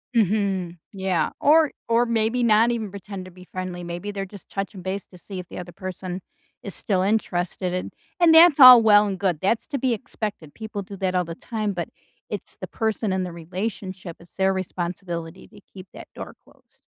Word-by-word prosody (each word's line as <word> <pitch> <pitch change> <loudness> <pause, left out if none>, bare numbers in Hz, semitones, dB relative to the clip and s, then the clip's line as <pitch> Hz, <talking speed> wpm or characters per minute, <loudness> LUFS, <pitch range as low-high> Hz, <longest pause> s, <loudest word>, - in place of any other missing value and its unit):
Mhm. 195 -4 +1
Yeah. 190 -5 0
Or 310 0 +5 0.2
or 235 +1 +3
maybe 230 +1 +1
not 225 +1 +4
even 220 -4 -3
pretend 195 -1 -8
to 185 - -11
be 180 +1 -15
friendly, 185 -1 -5
maybe 175 +4 -5
they're 195 -1 -4
just 200 0 -14
touching 195 -1 -5
base 190 +2 -4
to 180 - -15
see 190 +1 -8
if 180 - -8
the - - -7
other 175 0 -8
person 185 0 -6 0.4
is 200 - -4
still 190 -3 0
interested 185 -3 -1
and 180 - -4 0.3
and 335 -2 +6
that's 320 -2 +8
all 255 -2 +11
well 210 -1 +6
and 195 -2 -3
good, 180 -6 0
that's 220 +4 0
to 280 - -3
be 255 -1 +1
expected. 205 -8 -6
People 220 -2 -5
do 195 0 -9
that 185 -1 -1
all 180 -1 +2
the 165 0 -7
time, 215 -2 -3
but 175 -1 -4 0.4
it's - - -6
the - - -7
person 220 -2 -1
in 190 -1 0
the 180 - -5
relationship, 185 +1 -6
it's 175 - -17
their 190 0 +2
responsibility 175 -1 -5
to 205 -1 -17
keep 185 -1 -11
that - - -10
door - - -8
closed - - -26
195 Hz, 200 wpm, -24 LUFS, 180-220 Hz, 0.4 s, all